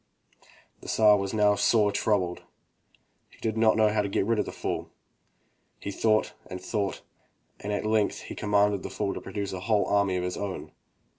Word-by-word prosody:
The -, -, -11 dB
Tsar 105 Hz, -1 st, +5 dB
was 100 Hz, -1 st, -2 dB
now 105 Hz, -1 st, +4 dB
sore 105 Hz, 0 st, +3 dB
troubled. 100 Hz, -3 st, 0 dB, 0.9 s
He -, -, -21 dB
did 110 Hz, -1 st, -2 dB
not 110 Hz, -1 st, +4 dB
know 110 Hz, -1 st, +5 dB
how 105 Hz, 0 st, +1 dB
to 100 Hz, -, -3 dB
get 95 Hz, -, 0 dB
rid 115 Hz, 0 st, +1 dB
of -, -, +1 dB
the -, -, -6 dB
fool. -, -, -4 dB, 0.9 s
He 100 Hz, -, -5 dB
thought 110 Hz, +1 st, +1 dB
and 90 Hz, -, -6 dB
thought, 100 Hz, +1 st, -3 dB, 0.6 s
and 105 Hz, -, -4 dB
at 105 Hz, +1 st, -2 dB
length 110 Hz, -1 st, +1 dB
he -, -, -8 dB
commanded 105 Hz, -1 st, +2 dB
the -, -, -6 dB
fool 100 Hz, -2 st, -2 dB
to -, -, -6 dB
produce 100 Hz, -3 st, -4 dB
a 95 Hz, -, -4 dB
whole 105 Hz, +2 st, +1 dB
army 100 Hz, -2 st, +2 dB
of 90 Hz, -, -1 dB
his 90 Hz, 0 st, -3 dB
own. 100 Hz, -2 st, -5 dB
105 Hz, 195 wpm, -27 LUFS, 100-110 Hz, 0.9 s, Tsar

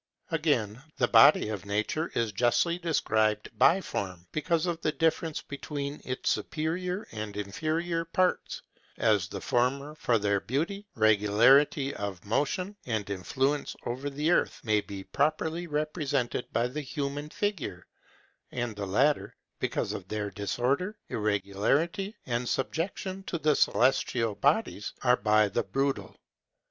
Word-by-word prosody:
Again, 135 Hz, -9 st, 0 dB, 0.2 s
the 120 Hz, -, +3 dB
body 115 Hz, -2 st, +7 dB
of 105 Hz, -3 st, -4 dB
nature 110 Hz, +11 st, -1 dB
is 115 Hz, -2 st, +1 dB
justly 125 Hz, -, +2 dB
described 110 Hz, -10 st, +1 dB
biform, 95 Hz, -, +2 dB
because 160 Hz, +2 st, 0 dB
of 170 Hz, -2 st, -2 dB
the 155 Hz, -, +1 dB
difference 160 Hz, -1 st, 0 dB
between 140 Hz, 0 st, -5 dB
its 130 Hz, 0 st, -1 dB
superior 180 Hz, +6 st, -2 dB
and 105 Hz, -2 st, -6 dB
inferior 160 Hz, -, -1 dB
parts, 180 Hz, +2 st, 0 dB, 0.3 s
as 105 Hz, -5 st, +2 dB
the -, -, -6 dB
former, 140 Hz, +4 st, 0 dB
for 120 Hz, -6 st, +1 dB
their 100 Hz, -1 st, +1 dB
beauty, 185 Hz, -, -2 dB
regularity 115 Hz, +7 st, +4 dB
of 100 Hz, -3 st, -5 dB
motion, 180 Hz, -, -1 dB
and 110 Hz, -4 st, -1 dB
influence 135 Hz, +9 st, -1 dB
over 130 Hz, +4 st, -3 dB
the 150 Hz, +4 st, 0 dB
earth, -, -, +2 dB
may 105 Hz, -2 st, +2 dB
be 100 Hz, -1 st, -8 dB
properly 155 Hz, -, 0 dB
represented 150 Hz, -5 st, -1 dB
by 115 Hz, -, +1 dB
the 145 Hz, +5 st, -4 dB
human 145 Hz, +1 st, -4 dB
figure, 170 Hz, -, -3 dB, 0.7 s
and 120 Hz, -3 st, -3 dB
the 100 Hz, -1 st, -4 dB
latter, 135 Hz, +10 st, +2 dB, 0.2 s
because -, -, -1 dB
of 95 Hz, -, -6 dB
their 105 Hz, 0 st, -3 dB
disorder, 125 Hz, -, -1 dB
irregularity, 105 Hz, -, 0 dB
and 120 Hz, 0 st, -1 dB
subjection 185 Hz, +7 st, -2 dB
to 185 Hz, -, -3 dB
the 155 Hz, -2 st, +2 dB
celestial 120 Hz, -4 st, +2 dB
bodies, 140 Hz, -, 0 dB
are 125 Hz, -1 st, +5 dB
by 105 Hz, 0 st, +4 dB
the 100 Hz, +4 st, 0 dB
brutal. 135 Hz, +7 st, -2 dB
135 Hz, 135 wpm, -29 LUFS, 105-160 Hz, 0.7 s, body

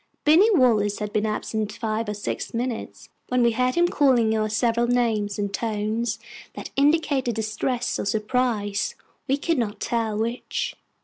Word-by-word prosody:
Binny 335 Hz, +9 st, +6 dB
Wallace 215 Hz, -6 st, +3 dB
had 210 Hz, -1 st, -5 dB
been 215 Hz, +1 st, +1 dB
absent 215 Hz, 0 st, -2 dB
five 220 Hz, 0 st, -2 dB
or 210 Hz, -, -2 dB
six 205 Hz, -, -4 dB
minutes, 240 Hz, 0 st, -4 dB, 0.2 s
when 250 Hz, -1 st, +2 dB
we 235 Hz, -, +4 dB
heard 250 Hz, +2 st, +1 dB
him 345 Hz, 0 st, +4 dB
calling 250 Hz, -9 st, +3 dB
our 215 Hz, 0 st, 0 dB
several 235 Hz, +2 st, +1 dB
names 225 Hz, -4 st, +1 dB
in 205 Hz, -1 st, -1 dB
tones 215 Hz, +1 st, -2 dB, 0.4 s
that -, -, -7 dB
indicated 280 Hz, -4 st, +2 dB
distress 225 Hz, +3 st, -2 dB
or -, -, -2 dB
surprise, 215 Hz, -1 st, 0 dB, 0.3 s
we 275 Hz, -, +2 dB
could 330 Hz, 0 st, 0 dB
not 210 Hz, -3 st, -2 dB
tell 225 Hz, -3 st, -1 dB
which. 245 Hz, -, -2 dB
230 Hz, 160 wpm, -24 LUFS, 215-250 Hz, 0.4 s, Binny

